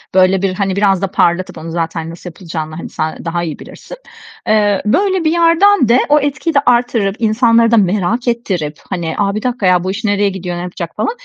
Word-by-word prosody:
böyle 185 Hz, 0 st, +4 dB
bir, 195 Hz, -1 st, 0 dB
hani, 195 Hz, 0 st, -2 dB
biraz 195 Hz, -2 st, +2 dB
da 195 Hz, -, 0 dB
parlatıp 180 Hz, 0 st, 0 dB
onu 165 Hz, +1 st, -7 dB
zaten 165 Hz, -1 st, -3 dB
nasıl 170 Hz, +2 st, -9 dB
yapılacağını, 160 Hz, -3 st, -7 dB
hani, 170 Hz, -, -7 dB
sen 155 Hz, +2 st, -4 dB
daha 170 Hz, +1 st, -2 dB
iyi 160 Hz, -4 st, -5 dB
bilirsin, -, -, -11 dB, 0.5 s
eee, 205 Hz, -2 st, +2 dB
böyle 375 Hz, -, +1 dB
bir 315 Hz, -, +2 dB
yerden 340 Hz, -, +4 dB
de 240 Hz, +2 st, +5 dB
o 300 Hz, +1 st, +5 dB
etkiyi 285 Hz, +3 st, -2 dB
de 280 Hz, -, +4 dB
arttırıp, 235 Hz, -5 st, +1 dB
insanları 230 Hz, +1 st, +3 dB
da 230 Hz, -, +4 dB
merak 210 Hz, +5 st, 0 dB
ettirip, 185 Hz, -11 st, -2 dB
hani, 170 Hz, -4 st, -3 dB
a, 200 Hz, -1 st, 0 dB
bir 215 Hz, -, -2 dB
dakika 250 Hz, -4 st, -2 dB
ya 180 Hz, -1 st, +3 dB
bu 185 Hz, -, -2 dB
iş 210 Hz, +4 st, -6 dB
nereye 205 Hz, -1 st, +1 dB
gidiyor, 180 Hz, -2 st, -5 dB
ne -, -, -4 dB
yapacak 175 Hz, -1 st, -6 dB
falan, -, -, -1 dB
200 Hz, 215 wpm, -15 LUFS, 175-235 Hz, 0.5 s, de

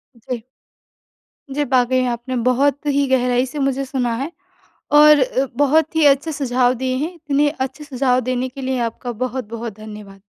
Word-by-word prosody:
जी। 235 Hz, 0 st, -6 dB, 1.1 s
जी, 295 Hz, -, +1 dB
वाक़ई 255 Hz, -1 st, +2 dB
आपने 240 Hz, +2 st, -4 dB
बहुत 275 Hz, +3 st, +2 dB
ही 285 Hz, 0 st, +2 dB
गहराई 250 Hz, -1 st, +2 dB
से 265 Hz, +3 st, -7 dB
मुझे 275 Hz, 0 st, 0 dB
सुना 255 Hz, -3 st, -1 dB
है, 275 Hz, +7 st, -4 dB, 0.6 s
और 300 Hz, 0 st, +7 dB
अ, 260 Hz, +1 st, +1 dB
बहुत 300 Hz, +3 st, +2 dB
ही 320 Hz, -1 st, +4 dB
अच्छे 285 Hz, +3 st, +3 dB
सुझाव 255 Hz, -3 st, +1 dB
दिए 255 Hz, 0 st, 0 dB
हैं, 315 Hz, +6 st, -3 dB
इतने 290 Hz, -2 st, +1 dB
अच्छे 270 Hz, 0 st, -5 dB
सुझाव 260 Hz, -3 st, +1 dB
देने 255 Hz, 0 st, -1 dB
के 270 Hz, +2 st, -10 dB
लिए 260 Hz, -1 st, -2 dB
आपका 245 Hz, +2 st, -7 dB
बहुत-बहुत 235 Hz, -3 st, -5 dB
धन्यवाद। 210 Hz, -2 st, -11 dB
260 Hz, 160 wpm, -19 LUFS, 245-285 Hz, 1.1 s, और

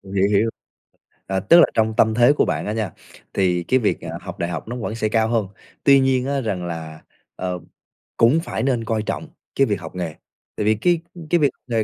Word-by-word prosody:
Hiểu, 95 Hz, +1 st, +3 dB
hiểu. 105 Hz, +2 st, +3 dB, 0.8 s
Ờ, 95 Hz, 0 st, 0 dB
tức 170 Hz, -, +6 dB
là -, -, +8 dB
trong 110 Hz, -1 st, +1 dB
tâm 110 Hz, 0 st, +4 dB
thế 120 Hz, +4 st, +5 dB
của -, -, +2 dB
bạn -, -, -2 dB
á 105 Hz, -, -2 dB
nha, 110 Hz, -6 st, -2 dB, 0.4 s
thì 90 Hz, -2 st, +1 dB
cái 130 Hz, +8 st, +2 dB
việc, 110 Hz, -, 0 dB
ờ, 85 Hz, 0 st, -6 dB
học 90 Hz, -2 st, -8 dB
đại 85 Hz, -, -1 dB
học 90 Hz, -, -5 dB
nó 120 Hz, -, -4 dB
vẫn 115 Hz, -2 st, -4 dB
sẽ 110 Hz, -2 st, -1 dB
cao 110 Hz, 0 st, +2 dB
hơn. 115 Hz, -4 st, 0 dB, 0.4 s
Tuy 140 Hz, -1 st, +7 dB
nhiên 130 Hz, -1 st, +2 dB
á 140 Hz, -1 st, 0 dB
rằng 95 Hz, -7 st, -3 dB
là, 80 Hz, -2 st, -6 dB, 0.3 s
ờ, 90 Hz, -1 st, -3 dB, 0.6 s
cũng 120 Hz, +8 st, +5 dB
phải 110 Hz, -, -3 dB
nên 125 Hz, -4 st, +1 dB
coi 110 Hz, -2 st, -1 dB
trọng 160 Hz, -, -4 dB, 0.3 s
cái 135 Hz, -2 st, +3 dB
việc 100 Hz, -3 st, -1 dB
học 80 Hz, +2 st, -9 dB
nghề, 85 Hz, -4 st, -3 dB, 0.4 s
tại 105 Hz, -, -1 dB
vì 110 Hz, -, +4 dB
cái 170 Hz, +10 st, +2 dB, 0.3 s
cái 175 Hz, -, +3 dB
việc 145 Hz, -3 st, +4 dB, 0.2 s
nghề 115 Hz, -2 st, +1 dB
110 Hz, 230 wpm, -21 LUFS, 95-125 Hz, 0.8 s, là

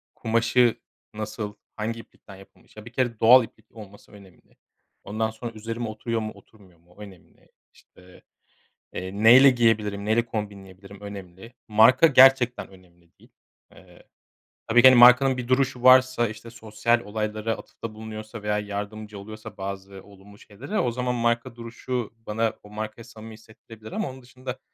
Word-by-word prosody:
kumaşı 115 Hz, +1 st, +1 dB, 0.4 s
nasıl, 105 Hz, -1 st, -6 dB, 0.2 s
hangi 115 Hz, +2 st, -4 dB
iplikten 100 Hz, -3 st, -15 dB
yapılmış, 95 Hz, +2 st, -20 dB
ya, 105 Hz, -, -11 dB
bir 115 Hz, -, -11 dB
kere 120 Hz, -3 st, -2 dB
doğal 125 Hz, +3 st, +7 dB
iplik 110 Hz, -1 st, -15 dB
olması 105 Hz, -3 st, -14 dB
önemli. 100 Hz, -4 st, -19 dB, 0.5 s
Ondan 110 Hz, +2 st, -2 dB
sonra 115 Hz, +2 st, -8 dB
üzerime 115 Hz, +2 st, -6 dB
oturuyor 115 Hz, +1 st, -4 dB
mu, 110 Hz, 0 st, -5 dB
oturmuyor 95 Hz, -6 st, -21 dB
mu 85 Hz, +1 st, -28 dB
o -, -, -14 dB
önemli. 95 Hz, -4 st, -17 dB, 0.2 s
İşte, 90 Hz, 0 st, -21 dB, 0.7 s
eee, 95 Hz, 0 st, -6 dB
neyle 130 Hz, +5 st, +8 dB
giyebilirim, 110 Hz, -5 st, 0 dB
neyle 115 Hz, +2 st, +1 dB
kombinleyebilirim 100 Hz, -3 st, -8 dB
önemli. 100 Hz, +2 st, -11 dB
Marka 115 Hz, +8 st, +5 dB
gerçekten 130 Hz, -3 st, +4 dB
önemli 85 Hz, -3 st, -22 dB
değil. -, -, -21 dB, 0.4 s
Eee, -, -, -19 dB, 0.6 s
tabii 120 Hz, +2 st, +4 dB
ki, 130 Hz, -, +9 dB
hani, 130 Hz, -2 st, +5 dB
markanın 125 Hz, +2 st, +6 dB
bir 125 Hz, -1 st, -5 dB
duruşu 130 Hz, -1 st, 0 dB
varsa. 130 Hz, -2 st, +5 dB
İşte, 110 Hz, +2 st, -11 dB
sosyal 115 Hz, +1 st, -1 dB
olaylara 110 Hz, +1 st, -4 dB
atıfta 115 Hz, -1 st, -10 dB
bulunuyorsa 110 Hz, 0 st, -9 dB
veya 105 Hz, 0 st, -1 dB
yardımcı 105 Hz, 0 st, -7 dB
oluyorsa 110 Hz, +1 st, -11 dB
bazı 95 Hz, 0 st, -8 dB
olumlu 100 Hz, 0 st, -17 dB
şeylere 110 Hz, -, -6 dB
o 120 Hz, -, 0 dB
zaman 125 Hz, +1 st, -2 dB
marka 120 Hz, +1 st, -1 dB
duruşu 120 Hz, 0 st, -6 dB
bana 115 Hz, 0 st, -3 dB
o 105 Hz, -, -15 dB
markayı 110 Hz, +2 st, -7 dB
samimi 110 Hz, -1 st, -12 dB
hissettirebilir 110 Hz, 0 st, -15 dB
ama -, -, -3 dB
onun 130 Hz, 0 st, -12 dB
dışında 130 Hz, +1 st, -9 dB
110 Hz, 155 wpm, -24 LUFS, 105-120 Hz, 0.7 s, ki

